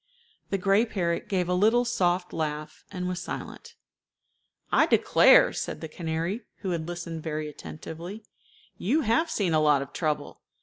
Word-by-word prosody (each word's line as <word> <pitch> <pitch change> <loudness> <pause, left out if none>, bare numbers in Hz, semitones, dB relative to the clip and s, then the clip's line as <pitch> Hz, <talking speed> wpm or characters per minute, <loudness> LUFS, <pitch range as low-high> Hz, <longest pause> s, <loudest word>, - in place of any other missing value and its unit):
The 195 - 0
gray 195 +3 +3
parrot 175 -7 -2
gave 185 -3 0
a 180 - 0
little 220 +6 +3
soft 180 -6 0
laugh, 155 -1 -4
and 180 -2 -3
was 180 -1 -3
silent. - - -7 1.0
"I - - +4
declare," - - +6
said - - -4
the 160 - -6
canary, 165 +6 -3 0.2
who 190 - -2
had 165 -2 -2
listened 170 -2 -5
very 155 -1 -3
attentively, 165 +7 -8 0.6
"you 275 - +2
have 280 +7 +2
seen 190 - 0
a 155 - +4
lot 145 -2 +4
of 140 - -14
trouble. 155 -3 -2
175 Hz, 160 wpm, -27 LUFS, 160-200 Hz, 1.0 s, declare